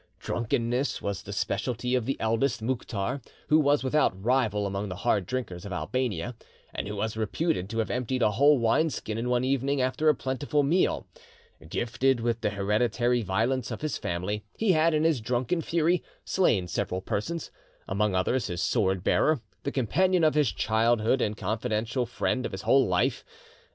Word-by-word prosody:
Drunkenness 120 +3 -1
was 100 -2 -3
the 100 - -9
speciality 115 +5 -2
of 125 -3 +1
the 135 - -1
eldest, 115 +5 +1
Mouktar, 115 0 -2 0.3
who 155 - +6
was 145 -2 +3
without 130 -8 +1
rival 110 -2 +1
among 100 +1 -3
the 90 - -4
hard 100 -2 0
drinkers 115 -9 -4
of 100 - -7
Albania, 110 0 -2 0.4
and - - -4
who 105 - -4
was 110 +2 -2
reputed 110 - -1
to 115 - -4
have 110 - 0
emptied 125 0 -1
a 105 - +4
whole 145 +7 +5
wine 120 +7 +2
skin 110 -6 -4
in 120 +2 -2
one 125 0 +2
evening 135 +1 0
after 130 +5 +2
a 150 - +4
plentiful 140 +3 -1
meal. 170 +7 +1 0.6
Gifted 120 +5 +1
with 115 0 -1
the - - +1
hereditary 110 +4 +1
violence 115 +6 0
of - - -5
his 155 -2 -2
family, 95 +5 -3
he 220 -3 +3
had, 160 -1 +3
in 155 - +2
his 160 -7 +2
drunken 125 +9 0
fury, 170 +2 +1 0.2
slain 110 - +2
several 90 +2 -2
persons, 160 - -3 0.4
among 100 0 0
others 120 +8 +1
his 90 0 -3
sword 95 -2 +1
bearer, 155 +6 +3 0.2
the 140 - -3
companion 175 - +2
of 155 - +4
his 150 -8 +2
childhood 115 +5 +2
and 105 0 -1
confidential 110 +2 -1
friend 125 +2 -1
of - - -4
his 95 - -5
whole 135 -1 +4
life. 90 -1 +1
120 Hz, 175 wpm, -27 LUFS, 105-135 Hz, 0.6 s, who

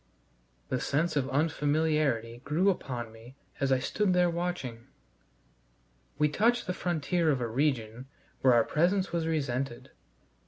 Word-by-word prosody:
The 130 - 0
sense 155 +4 0
of 140 -2 0
unfamiliarity 145 -5 +1
grew 170 +7 +2
upon 120 -10 -5
me 115 +4 -14 0.2
as 135 -1 +1
I 130 - +5
stood 190 +8 0
there 180 -1 +3
watching. 170 -10 -4 1.3
We 150 +1 +3
touched 235 +10 +2
the 180 - -2
frontier 175 -1 0
of 140 -4 +2
a 120 - -1
region 125 -1 -1 0.3
where 130 -2 +5
our 115 - +5
presence 185 - +1
was 165 -1 -1
resented. 135 -5 -2
145 Hz, 135 wpm, -29 LUFS, 125-170 Hz, 1.3 s, I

